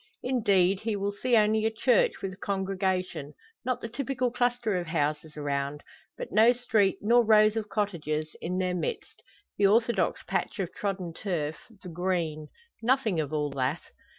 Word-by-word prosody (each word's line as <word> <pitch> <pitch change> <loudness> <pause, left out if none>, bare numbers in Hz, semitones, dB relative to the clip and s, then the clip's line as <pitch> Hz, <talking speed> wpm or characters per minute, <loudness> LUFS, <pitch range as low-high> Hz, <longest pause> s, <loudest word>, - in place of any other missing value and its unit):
Indeed, 200 -7 +2
he 220 0 -2
will 200 0 -1
see 235 +4 +1
only 215 0 +3
a 220 - +3
church 225 0 +2
with 190 -1 -3
a - - -13
congregation, 190 -6 -2 0.3
not 255 0 -1
the - - -4
typical 250 +1 -2
cluster 245 -4 0
of 175 - -5
houses 155 -1 -2
around. 140 0 -2 0.3
But - - -6
no 225 +3 +6
street, 220 -5 +1
nor 235 +3 +4
rows 215 -1 +5
of 215 -2 -3
cottages, 155 -7 -2
in 180 +2 -2
their 185 -1 0
midst 170 -4 -4 0.4
the 200 - +6
orthodox 230 +3 +2
patch - - -2
of 190 -4 -3
trodden 190 -4 -3
turf 160 -5 -3 0.3
the - - -8
"green." 165 -3 -2 0.3
Nothing 230 -6 +2
of 150 -2 -2
all 150 -2 -1
that. 135 +4 -1
195 Hz, 165 wpm, -28 LUFS, 165-225 Hz, 0.4 s, no